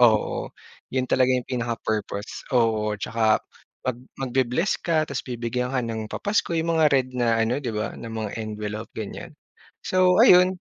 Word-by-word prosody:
oo. 110 -3 +3 0.4
'Yon 130 -1 +1
talaga 130 0 +4
'yong 125 - -1
pinaka-purpose 115 -4 -3
oo. 110 -2 +2
Tsaka 110 +1 +1 0.4
mag 130 -2 -1 0.2
magbe-bless 130 - +1
ka 160 -3 +1
tapos 140 - -4
bibigyan 125 +1 -2
ka 130 - +2
ng 115 -2 -3
papasko 205 -3 0
'yong 165 0 0
mga 155 - +6
red 130 -2 +3
na 115 -2 +2
ano 115 +3 +1
'di 125 -5 -4
ba, 105 +2 -2
na 115 - -7
mga 110 -2 -4
envelope, 105 0 -5
ganyan. 110 -2 -6 0.5
So, 185 -1 +3
ayun. 180 +1 +6
120 Hz, 155 wpm, -24 LUFS, 110-135 Hz, 0.5 s, mga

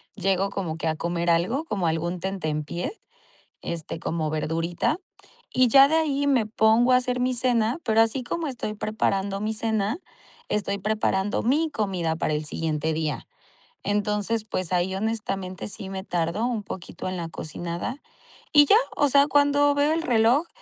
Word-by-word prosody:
llego 195 0 +1
como 175 -5 -4
que 165 - -3
a 155 - 0
comer 170 +1 -2
algo 180 - +2
como 200 - -2
algún 170 +2 -1
tentempié, 170 - -3 0.6
este, 165 -1 -5
como 160 -2 -2
verdurita 165 - -1 0.5
y 255 0 +4
ya 275 +3 +8
de 315 - +1
ahí 285 -3 +1
me 260 -6 +3
pongo 220 +3 +3
a 250 - +7
hacer 250 0 -1
mi 255 +1 +1
cena. 240 +1 +1
Pero 220 0 +4
así 225 +3 +1
como 330 +7 -3
estoy 235 -5 -4
preparando 200 -2 -1
mi 215 +1 -1
cena, 220 +2 0 0.5
estoy 200 -1 -1
preparando 205 -1 0
mi 300 +6 +1
comida 185 - -1
para 155 - -1
el 150 +1 -3
siguiente 160 0 -2
día. 155 -2 -2 0.6
Entonces, 210 +2 0
pues 185 -4 -3
ahí, 180 +1 +1
honestamente, 195 -3 -3
sí 195 -1 -7
me 190 0 -5
tardo 175 +4 -1
un 230 -4 -2
poquito 190 -2 -7
en 185 - -3
la 165 -1 -4
cocinada 170 - -5 0.5
y 290 -1 +8
ya, 405 - +6 0.2
o 290 -1 +3
sea, 280 +1 +5
cuando 285 0 +3
veo 290 +1 +3
el 330 - 0
reloj 245 +4 +3
205 Hz, 165 wpm, -25 LUFS, 175-250 Hz, 0.6 s, ya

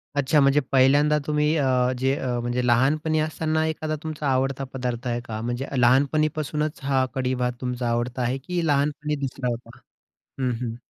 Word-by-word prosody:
अच्छा, 145 +2 +3
म्हणजे 140 +1 +4
पहिल्यांदा 145 +3 +4
तुम्ही 150 +1 +2
अ, 130 -3 +2
जे 130 +2 +1
अ, - - -4
म्हणजे 120 +1 -1
लहानपणी 150 +6 +2
असताना 155 0 0
एखादा 155 -1 -2
तुमचा 155 -2 -4
आवडता 135 0 0
पदार्थ 125 -1 -3
आहे 120 0 -1
का? 110 -2 -6
म्हणजे 120 +3 -3
लहानपणीपासूनच 150 +4 +1
हा 135 -1 +2
कढी-भात 125 -1 0
तुमचा 125 -1 -2
आवडता 120 +2 -1
आहे, 125 +2 0
की 170 +5 -3
लहानपणी 150 +1 0
दुसरा 130 -1 -4
होता? 120 0 -7 0.6
हं, 130 -1 +1
हं. 120 -2 -3
135 Hz, 160 wpm, -24 LUFS, 125-150 Hz, 0.6 s, म्हणजे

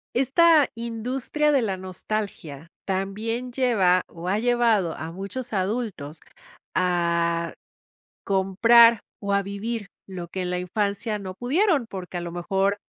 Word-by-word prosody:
Esta 295 +4 +5
industria 250 +6 -1
de 275 -4 +3
la 195 -4 -1
nostalgia 185 -5 -5 0.2
también 215 +6 -2
lleva, 210 -8 +3
o 170 +1 -9
ha 200 - +2
llevado 230 -7 +2
a 160 +1 -6
muchos 200 +8 -6
adultos 190 -7 -3 0.6
a 170 -2 +1 0.7
comprar, 225 +4 +5 0.2
o 200 0 -2
a 200 0 +2
vivir 205 +2 -4 0.2
lo 180 -2 -6
que 185 +2 -5
en 180 - -2
la 180 0 -1
infancia 205 +4 -1
no 190 -2 -7
pudieron, 290 - +1
porque 185 -2 -6
a - - -3
lo 170 -1 -6
mejor 195 +3 0
200 Hz, 135 wpm, -24 LUFS, 180-235 Hz, 0.7 s, Esta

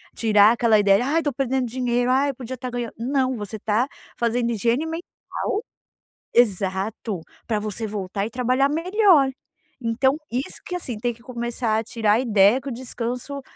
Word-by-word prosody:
Tirar 210 -2 +5
aquela 230 -2 +4
ideia: 200 +3 +4
"Ai, 300 +5 +2
estou 290 -3 -1
perdendo 265 0 0
dinheiro. 245 0 0
Ai, 275 +2 +2
podia 255 0 -7
estar 255 0 -6
ganhando". 240 -2 -4
Não, 260 +1 0
você 210 0 -6
está 215 +4 +1 0.3
fazendo 235 0 0
higiene 235 +6 +1
mental 325 +1 -4 1.3
Exato. 200 -2 +1 0.3
Pra 220 -3 0
você 215 +1 -4
voltar 200 -1 -3
e - - -8
trabalhar 255 +3 +1
melhor. 335 -3 +4 0.5
Então, 255 +4 +1
isso 255 +4 -3
que, 360 - -4
assim, 255 -10 -4
tem 240 +2 -1
que 230 - -20
começar 235 -2 -2
a - - -3
tirar 220 -2 +1
a 220 - +3
ideia 220 0 +4
que 280 - -6
o - - -5
descanso 250 +2 -4
240 Hz, 170 wpm, -23 LUFS, 220-265 Hz, 1.3 s, Tirar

